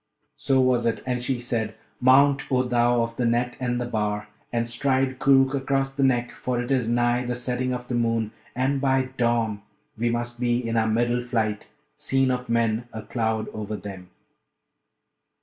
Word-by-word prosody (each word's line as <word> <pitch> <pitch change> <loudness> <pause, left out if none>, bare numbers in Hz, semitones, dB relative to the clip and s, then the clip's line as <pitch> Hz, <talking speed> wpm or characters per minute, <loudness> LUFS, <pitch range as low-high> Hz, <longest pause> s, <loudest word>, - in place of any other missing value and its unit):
So 135 -2 +2
was 125 -2 +3
it; 115 - -1
and 125 -1 -1
she 130 -1 -1
said, 115 -3 -2 0.2
'Mount, 135 +3 +4
O 130 -1 +3
thou 120 -1 +2
of 115 0 -5
the 125 - 0
net 120 +1 0
and 125 -1 -1
the 125 - -2
bar! 105 -3 -2 0.2
and 115 -1 0
stride 130 +2 0
Koorookh 135 0 +4
across 135 0 0
the 140 - -3
neck, 125 -3 +2
for 125 -1 -3
it 125 +2 -3
is 125 -4 +1
nigh 120 +1 +2
the 125 0 -2
setting 125 +1 -2
of 125 0 -4
the - - -4
moon, 115 -2 0 0.2
and 135 +2 0
by 130 -1 +2
dawn 115 -3 +1 0.3
we 120 +2 0
must 120 0 -3
be 120 -1 +2
in 115 - -1
our 110 -1 +2
middle 120 +2 +1
flight, 110 -4 -2 0.3
seen 135 -1 +1
of 125 -1 -3
men, 115 0 +1
a 110 - -7
cloud 110 -1 -1
over 105 0 -5
them.' 95 -3 -9
120 Hz, 185 wpm, -25 LUFS, 115-130 Hz, 0.3 s, Mount